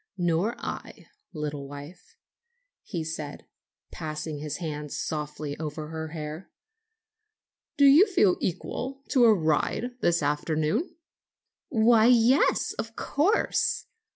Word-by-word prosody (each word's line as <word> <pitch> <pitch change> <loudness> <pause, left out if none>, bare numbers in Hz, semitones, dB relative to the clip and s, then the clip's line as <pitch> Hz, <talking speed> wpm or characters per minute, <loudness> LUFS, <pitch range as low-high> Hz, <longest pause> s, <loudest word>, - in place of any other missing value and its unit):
"Nor 175 +6 +1
I, - - -7 0.2
little 150 -3 -5
wife," 150 - -11 0.6
he 170 -6 -4
said, 155 -2 -6 0.5
passing 155 -1 -5
his 150 -1 -4
hand 150 -4 -5
softly 150 -1 -4
over 155 -1 -5
her 160 0 -5
hair. 155 +2 -7 1.3
"Do 285 - +6
you 300 +10 +8
feel 210 - +3
equal 255 +9 -4
to 250 -4 +5
a 225 - +8
ride 160 +8 0
this 170 -2 +2
afternoon?" 155 - 0 0.7
"Why, 225 -2 +5
yes; 245 +3 +4
of 225 0 -4
course! 350 +10 +1
165 Hz, 110 wpm, -27 LUFS, 150-235 Hz, 1.3 s, you